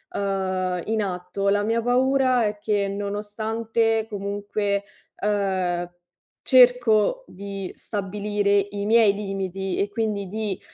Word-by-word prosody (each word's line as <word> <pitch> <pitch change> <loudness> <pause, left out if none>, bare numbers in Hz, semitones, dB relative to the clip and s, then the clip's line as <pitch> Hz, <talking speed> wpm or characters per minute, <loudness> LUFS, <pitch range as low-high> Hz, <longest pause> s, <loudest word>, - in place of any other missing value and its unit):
uhm, 185 -2 -1
in 220 0 0
atto. 195 +1 -2
La 205 +1 +2
mia 225 +2 +1
paura 255 0 +3
è 210 0 -2
che 205 -1 0
nonostante 220 +3 -1
comunque, 205 0 -2 0.4
uhm, 190 -4 0 0.6
cerco 250 - +5
di 195 0 -7
stabilire 205 0 -1
i 200 0 -3
miei 220 -1 +5
limiti 195 -2 -3
e 200 - +1
quindi 205 -2 -2
di, 210 -1 -3
205 Hz, 110 wpm, -24 LUFS, 195-220 Hz, 0.6 s, cerco